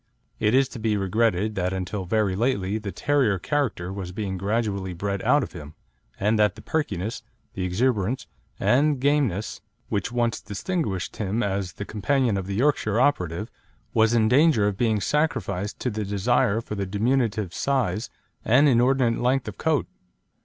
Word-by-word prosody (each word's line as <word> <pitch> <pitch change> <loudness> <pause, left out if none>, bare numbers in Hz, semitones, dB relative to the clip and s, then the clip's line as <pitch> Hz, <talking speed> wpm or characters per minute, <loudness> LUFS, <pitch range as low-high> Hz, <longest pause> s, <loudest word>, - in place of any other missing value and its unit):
It 105 +3 +2
is 135 0 +4
to 120 - -8
be 110 -1 +1
regretted 105 +1 +1
that 95 -1 -1
until 95 +1 -3
very 105 0 +1
lately 105 -3 0
the 105 -2 -5
terrier 135 -8 +1
character 105 - -2
was 95 -3 -5
being 95 0 -3
gradually 100 -1 -1
bred 100 +2 -2
out 145 -1 +3
of - - -6
him, 75 -3 -10 0.4
and 105 +2 +2
that 105 -2 +3
the 110 - -12
perkiness, 115 - -2 0.3
the 95 - -4
exuberance 115 +4 0 0.3
and 145 +2 +3
gameness 135 -8 0 0.3
which 100 +1 -1
once 120 -1 0
distinguished 100 - -3
him 110 +3 -1
as 95 -3 -2
the 105 - -6
companion 120 +2 +1
of 95 -1 -3
the 100 - -3
Yorkshire 115 -3 +1
operative, 105 - 0 0.4
was 110 +1 +3
in 110 -2 +4
danger 130 -3 +4
of 105 - -1
being 110 0 +1
sacrificed 105 - -1
to 125 - -1
the 110 0 -3
desire 105 +3 +1
for 110 - -7
diminutive 105 0 0
size 130 -5 -1 0.3
and 135 +6 +5
inordinate 125 -1 +3
length 130 +1 +1
of - - -7
coat. 155 -5 +1
110 Hz, 160 wpm, -25 LUFS, 100-125 Hz, 0.4 s, and